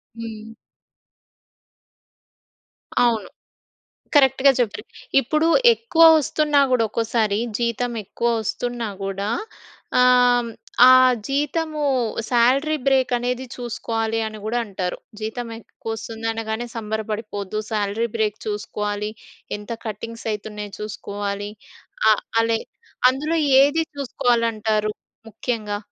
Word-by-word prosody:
హ్మ్. 225 -1 -8 2.5
అవును. 230 -3 +1 0.9
కరెక్ట్‌గా 270 -1 +5
చెప్పారు. 215 -3 -1 0.4
ఇప్పుడు 305 +5 +1 0.3
ఎక్కువ 460 -8 +1
వస్తున్నా 300 0 +2
గూడా 250 -3 +3
ఒక్కోసారి, 220 -1 0 0.2
జీతం 240 +1 -1
ఎక్కువ 235 +5 -2
వస్తున్నా 240 +1 -3 0.2
గూడా 195 +1 -3 0.7
ఆహ్, 245 -1 +4 0.4
ఆ - - +10 0.4
జీతము 300 +2 -1 0.5
సాలరీ 265 +6 +3
బ్రేక్ 265 -1 +3
అనేది 250 +1 -2
చూసుకోవాలి 225 -2 -2
అని 215 0 -7
గూడా 235 +3 -1
అంటారు. 185 -3 -4 0.2
జీతం 225 +2 -4
ఎక్కువ 225 +1 -9
వస్తుంది 225 +1 -6
అనగానే 225 +1 -3
సంబరపడిపోవద్దు. 215 -2 -4
సాలరీ 210 +2 0
బ్రేక్ 215 -1 0
చూసుకోవాలి. 210 0 -3 0.5
ఎంత 210 +1 -12 0.2
కటింగ్స్ 230 +2 -6
అయితున్నాయో 210 -1 -6
చూసుకోవాలి. 205 -1 -4 0.6
ఆహ్, 215 - +3 0.2
అలె 225 0 +1 0.5
అందులో 300 +5 -2 0.3
ఏది 305 +4 +2
చూసుకోవాలి 245 -3 +1
అంటారు 215 -1 0 0.4
ముఖ్యంగా 215 -2 -3
225 Hz, 95 wpm, -22 LUFS, 215-250 Hz, 2.5 s, ఆ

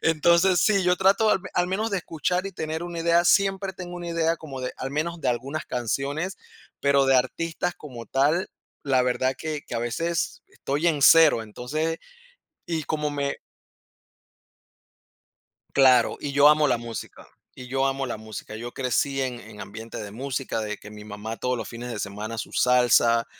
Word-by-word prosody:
Entonces 170 +3 +4
sí, 200 -3 +3
yo 180 0 +3
trato 200 +4 +4
al - - +2
al 180 - +2
menos 215 +4 -1
de 200 - 0
escuchar, 180 +3 -2
y 195 - -6
tener 160 -1 -4
una 175 -1 -5
idea, 170 +1 +3
siempre 195 +1 +2
tengo 175 -1 -7
una 175 -1 -6
idea 165 0 +1
como 140 -5 -8
de, 125 - -3
al 135 - -4
menos 165 +4 -2
de - - -1
algunas 130 +6 -2
canciones, 140 - -2 0.4
pero 140 -1 +4
de 135 0 +5
artistas 165 +6 -1
como 125 -6 -10
tal, 145 +7 +1 0.3
la 130 -3 +2
verdad, 130 +1 0
que 155 -2 -4
que - - -7
a - - 0
veces 165 +9 -2
estoy 145 +5 -2
en 150 -4 0
0, 160 -6 +7
entonces, 155 +9 -3 0.7
y 165 -2 -2
como 150 0 -2
me 140 -1 -2 2.4
claro, 130 -3 +5
y 145 - -4
yo 145 +1 +7
amo 150 0 +5
la 125 -4 +1
música 115 -1 -8 0.3
y 125 - -10
yo 135 +1 0
amo 135 0 -2
la 120 - -4
música. 110 -1 -8
Yo 120 +2 -6
crecí, 135 +2 0
en 125 -2 -3
en 110 -2 -12
ambiente 110 +3 -8
de 105 -2 -7
música, 130 0 -3
de 105 -1 -3
que 105 - -12
mi 105 0 -10
mamá, 105 +2 -6
todos 125 0 -1
los - - -5
fines 120 +1 -7
de 115 - -5
semana, 105 +3 -5
su - - -5
salsa, 120 -2 +4
140 Hz, 180 wpm, -25 LUFS, 120-165 Hz, 2.4 s, 0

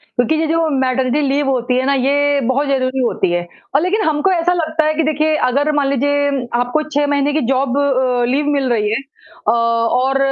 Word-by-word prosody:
क्योंकि 245 +6 +1
ये 320 0 0
जो 330 0 +1
मैटरनिटी 260 +2 0
लीव 280 +1 0
होती 250 -1 0
है 260 - 0
ना, 280 - +2
ये 285 +2 +1
बहुत 275 +3 0
ज़रूरी 265 -1 -1
होती 195 -6 -1
है 175 0 -2 0.3
और 280 - +4
लेकिन 375 +5 0
हमको 310 +5 +1
ऐसा 355 0 +1
लगता 315 -2 -1
है 310 - +1
कि 325 - 0
देखिए 310 +1 +1
अगर 285 +4 +1
मान 285 -2 +1
लीजिये 285 -1 0
आपको 245 +5 0
6 290 -1 +1
महीने 285 0 0
की 310 - 0
जॉब 265 0 0
अ, 255 -3 +1
लीव 275 +5 0
मिल 275 -2 0
रही 210 -2 0
है 220 - 0 0.5
अ, - - +5
और 230 +3 +1
275 Hz, 210 wpm, -17 LUFS, 255-295 Hz, 0.5 s, अ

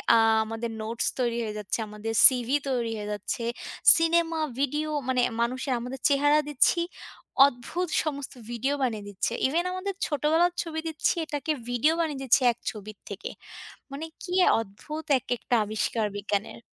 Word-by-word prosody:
আ - - +6 0.3
আমাদের 225 +1 -4
নোটস 225 +1 -2
তৈরি 235 -1 0
হয়ে 215 -1 -4
যাচ্ছে, 210 +3 -3
আমাদের 210 +2 -5
CV 250 -2 0 0.2
তৈরি 235 -3 -1
হয়ে 210 0 -5
যাচ্ছে। 210 +3 -4 0.5
ছিনেমা, 330 0 +2 0.2
ভিডিও 295 +3 0 0.2
মানে 255 -1 +2 0.2
মানুষের, 255 +2 -1
আমাদের 250 +2 -6
চেহারা 290 +2 +4
দিচ্ছি, 295 +4 +3 0.7
অদ্ভুত 280 +8 -2 0.2
সমস্ত 280 -3 -4 0.2
ভিডিও 260 +4 -1
বানিয়ে 220 -5 -1
দিচ্ছে। 205 +4 -2
ইভেন 340 +6 0
আমাদের 390 +2 -3
ছোটবেলার 320 +4 +2
ছবি 320 -1 -5
দিচ্ছি, 315 -1 0
এটাকে 300 +1 -3 0.2
ভিডিও 245 +7 +2
বানিয়ে 300 -5 -1
দিচ্ছে 265 +1 +4
এক - - -33
ছবির 210 -1 -10
থেকে। 200 +1 -6 0.6
মানে 290 +4 -5 0.2
কি 360 - -6 0.3
অদ্ভুত 300 +10 -8
এক - - -10
একটা 245 - -1
আবিষ্কার 215 +1 -1
বিজ্ঞানের। 205 +2 -3
255 Hz, 150 wpm, -27 LUFS, 225-310 Hz, 0.7 s, আ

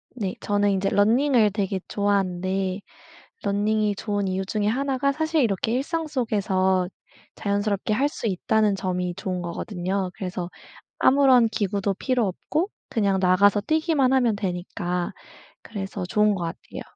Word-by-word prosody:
네. 200 -6 -3
저는 205 0 +1
인제 195 0 +1
러닝을 230 +1 +3
되게 195 -2 -1
좋아하는데 190 -1 0 0.6
러닝이 210 +1 +1
좋은 205 -2 -2
이유 190 +1 -1
중에 205 +1 -1
하나가 270 +4 +1
사실 315 +1 +1
이렇게 220 -1 0
일상 320 +6 -1
속에서 195 -9 +1 0.5
자연스럽게 205 0 -1
할 275 +6 +2
수 270 - -5
있다는 210 +1 +1
점이 180 -2 -2
좋은 185 -2 -3
거거든요. 185 +2 -3
그래서 180 -2 -4 0.5
아무런 260 -3 +5
기구도 200 -2 -1
필요 250 +2 0
없고 310 - -2 0.2
그냥 200 -7 +1
나가서 195 +3 +4
뛰기만 310 -1 +2
하면 245 -5 +3
되니까 180 -2 -3 0.5
그래서 195 -3 -5
좋은 210 +2 +3
것 185 -3 -3
같아요. 165 0 -7
205 Hz, 320 characters per minute, -24 LUFS, 190-235 Hz, 0.6 s, 아무런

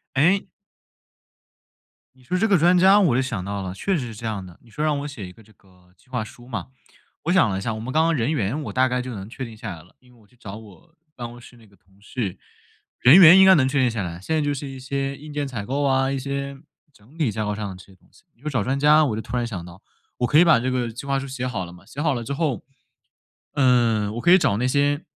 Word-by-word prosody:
哎。 180 +8 +2 1.7
你 130 - -23
说 180 +8 -2
这 225 - +2
个 200 -3 +4
专 175 +3 +4
家 190 +3 +6
我 170 -12 +3
就 130 - +2
想 115 -8 -4
到 100 0 -4
了， 95 -1 -5
确 190 - -1
实 130 -5 -4
是 115 - -9
这 115 - -9
样 105 -4 -3
的。 90 -2 -15
你 120 - -20
说 150 +7 -4
让 150 -2 +1
我 145 - -5
写 115 -10 -8
一 - - -11
个 110 +4 -18
这 110 +1 -22
个 90 -2 -26
计 125 - -29
划 125 -4 -2
书 120 +3 -14
嘛， 110 -8 -5 0.6
我 170 - 0
想 185 - +4
了 95 - -2
一 - - -6
下， 110 +2 -2
我 110 - -6
们 125 +4 -6
刚 160 - +3
刚 165 0 +2
人 125 +1 0
员 135 -2 -1
我 - - -6
大 130 0 +3
概 125 0 -1
就 125 0 -6
能 100 -1 -8
确 130 +2 -6
定 115 -2 -11
下 105 -4 -7
来 80 - -14
了。 90 - -24
因 125 -1 -23
为 120 - -22
我 105 - -24
去 115 - -28
找 105 -5 -9
我 110 - -16 0.2
办 120 -1 -6
公 120 +1 -12
室 120 - -15
那 115 -2 -19
个 100 - -24
同 95 +2 -29
事， 105 -3 -4 0.6
人 135 +8 +8
员 180 +1 +9
应 190 - +8
该 190 - +8
能 130 -4 +3
确 140 +1 0
定 130 -2 +3
下 115 -2 -3
来， 85 -1 -6
现 160 - -2
在 155 - +1
就 145 -1 0
是 140 0 -6
一 135 -1 -8
些 135 +1 -3
硬 150 +1 -11
件 145 -1 -3
采 120 -6 -5
购 140 +5 -1
啊、 135 -1 +2
一 135 - -1
些 140 +1 -4 0.3
整 130 +2 -22
体 150 -9 +1
架 110 +1 -3
构 105 - -2
上 105 -1 -4
的 95 - -8
这 90 - -14
些 95 - -19
东 - - -29
西。 - - -24
你 115 - -32
说 150 - -4
找 125 -8 0
专 135 +4 -1
家 150 +2 +5
我 120 -7 -1
就 110 - -4
突 125 - -5
然 120 - 0
想 100 -7 -6
到， 85 +2 -13 0.4
我 125 - 0
可 150 - +4
以 - - +8
把 165 -8 +5
这 130 +2 -2
个 125 -2 -1
计 120 +5 -9
划 140 -1 0
书 135 - -6
写 130 -1 -4
好 120 -7 -3
了 85 - -9
嘛。 90 0 -16
写 140 - -7
好 150 -2 +1
了 120 - -4
之 140 - -4
后， 140 -4 -2 0.9
嗯， 120 -6 +2
我 120 - -4
可 175 - +4
以 185 - +9
找 140 - +1
那 125 +3 0
些 145 +3 +1
125 Hz, 315 characters per minute, -23 LUFS, 110-145 Hz, 1.7 s, 员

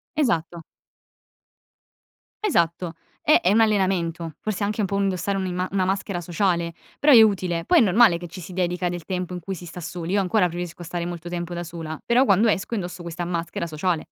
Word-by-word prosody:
Esatto. 170 - 0 1.8
Esatto. 170 - +1 0.3
È 310 - +5
è 180 - +3
un 225 - +5
allenamento. 185 -6 +1
Forse 215 -1 -3
anche 210 +2 -1
un 200 - 0
po' 200 - -1
indossare 195 0 0
un'imma 185 -1 -2
una 190 -2 +1
maschera 195 -1 -1
sociale; 170 -1 0 0.3
però 290 0 +6
è 230 - +10
utile. 185 -5 +2
Poi - - +4
è - - +6
normale 215 -3 +5
che 175 +1 -8
ci 180 +2 -9
si 180 +3 -9
dedica 180 0 -1
del 175 -2 -6
tempo 180 -1 -3
in 180 - -4
cui 190 +3 -5
si 175 - -10
sta 175 +1 -9
soli. 175 +1 -5
Io 200 - +3
ancora 185 0 +2
preferisco 175 0 -6
stare 170 0 -4
molto 175 -1 -6
tempo 175 0 -4
da 175 0 -4
sola, 160 -2 -6
però, 245 +3 +4
quando 215 +1 +4
esco 200 +4 -1
indosso 180 -3 -5
questa 170 0 -5
maschera 170 0 -3
sociale. 165 +1 -1
180 Hz, 200 wpm, -24 LUFS, 170-195 Hz, 1.8 s, è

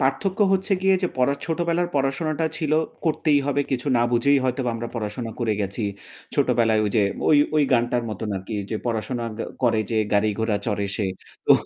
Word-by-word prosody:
পার্থক্য 185 +9 0
হচ্ছে 190 +2 +1
গিয়ে 190 0 +5
যে 180 - +2
পরা 130 +2 +3
ছোটবেলার 170 +1 0
পড়াশোনাটা 145 +3 0
ছিল 155 -3 -1 0.3
করতেই 155 -2 +2
হবে 145 0 +1
কিছু 130 0 -2
না 120 - +3
বুঝেই 140 +4 +4
হয়তোবা 125 -1 0
আমরা 115 +1 -4
পড়াশোনা 115 +1 -4
করে 115 -2 +1
গেছি। 100 +3 -3 0.5
ছোটবেলায় 120 -5 +3
ওইযে 105 +1 +2 0.3
ওই 150 - +6 0.2
ওই 150 - +5
গানটার 120 0 +2
মতন 105 +1 -4
আরকি 95 +4 -6 0.2
যে 110 - 0
পড়াশোনা 120 +1 -2 0.4
করে 115 -3 +3
গ - - -10
যে 115 - 0 0.2
গাড়িঘোড়া 105 +1 +1
চড়ে 105 -2 0
সে। 105 - -1 0.4
তো - - +1
125 Hz, 175 wpm, -23 LUFS, 110-145 Hz, 0.5 s, ওই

